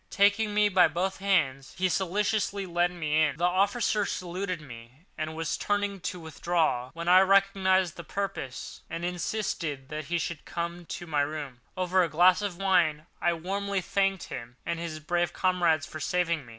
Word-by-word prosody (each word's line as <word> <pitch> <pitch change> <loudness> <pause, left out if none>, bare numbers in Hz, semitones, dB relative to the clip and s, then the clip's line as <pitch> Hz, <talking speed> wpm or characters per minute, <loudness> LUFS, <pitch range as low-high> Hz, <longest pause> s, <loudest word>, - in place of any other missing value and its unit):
Taking 205 +1 +3
me 210 0 +5
by 185 -3 +5
both 180 +5 -2
hands 155 -9 +1
he 185 0 +2
solicitously 200 +2 0
led 175 0 +1
me 155 -3 0
in. 150 -1 +1
The 170 - -4
officer 200 +4 +2
saluted 185 -1 -3
me 125 +2 -13
and 155 0 -4
was 165 -1 -1
turning 205 -1 -1
to 180 +1 -4
withdraw, 160 -5 0
when 170 0 -5
I 180 +1 +8
recognised 190 -2 +3
his 170 - -9
purpose, 195 -10 -5
and 170 +1 -4
insisted 175 -6 -3
that 155 0 -5
he 170 +2 -1
should 170 -2 -4
come 170 0 -5
to 175 - -6
my 150 -3 +1
rooms. 145 -4 -4 0.2
Over 185 0 +2
a 170 - +1
glass 180 +5 +5
of 200 -4 -3
wine 170 -6 +2 0.2
I 175 - +3
warmly 195 +4 -2
thanked 195 0 0
him 120 0 -7
and 170 -1 -2
his 165 -2 -5
brave 175 +2 0
comrades 175 -5 +2
for 155 - -8
saving 170 -2 0
me. - - -12
175 Hz, 175 wpm, -28 LUFS, 155-195 Hz, 0.2 s, I